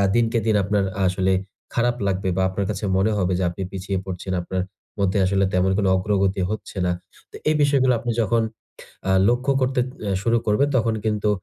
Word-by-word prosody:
দিনকে 115 0 +2
দিন 110 -2 +3
আপনার 100 0 +1 0.2
আসলে 95 +1 +1 0.4
খারাপ 120 +1 +1
লাগবে 95 0 0
বা - - +2
আপনার 95 +1 -2
কাছে 105 0 -3
মনে 100 +3 +2
হবে 95 -1 +1
যে - - 0
আপনি 90 - -7
পিছিয়ে 95 0 -3
পড়ছেন, 95 0 -4
আপনার 95 +1 -2 0.4
মধ্যে 100 +1 +1
আসলে 95 +1 +2
তেমন 90 +1 +2
কোন 100 - +1
অগ্রগতি 95 0 +1
হচ্ছে 110 -2 -5
না। 90 - +2 0.4
তো - - -12
এই 155 - +3
বিষয়গুলো 135 -3 +4
আপনি 120 0 -2
যখন 115 +2 +2 0.7
আ - - +3 0.2
লক্ষ্য 125 +3 +1
করতে 130 0 +1 0.2
অ্যা 100 -2 -1
শুরু 115 0 +3
করবেন 120 +7 +3
তখন 115 -1 +1
কিন্তু 105 -1 +1
100 Hz, 190 wpm, -23 LUFS, 95-115 Hz, 0.7 s, বিষয়গুলো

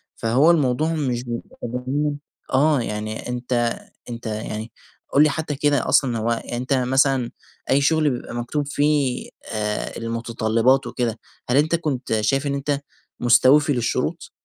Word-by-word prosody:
فهو 130 +9 +4
الموضوع 155 0 +1
مش 125 -5 -2
متجاهلين 130 +5 -3 0.3
آه 145 0 +4
يعني 110 +1 -4
أنت 120 -1 -1 0.3
أنت 115 0 -7
يعني 110 +1 -4 0.4
قُل 145 - +6
لي 155 - +4
حتى 150 0 -3
كده 145 -2 +1
أصلًا 120 -4 +3
هو 110 +2 -1
أنت 120 +3 -2
مثلًا 130 -1 +2 0.4
أي 140 +2 +4
شغل 155 +1 +3
بيبقى 120 -1 -5
مكتوب 140 +5 -2
فيه 145 -3 0 0.2
آآ 105 -1 -2
المتطلبات 115 +2 +1
وكده 120 -3 -2 0.3
هل 125 - +3
أنت 155 +3 +3
كنت 130 -9 -1
شايف 135 +6 +1
إن 140 - -1
أنت 140 0 -1 0.4
مستوفي 140 +4 +5
للشروط؟ 125 +7 -2
130 Hz, 135 wpm, -22 LUFS, 120-145 Hz, 0.4 s, قُل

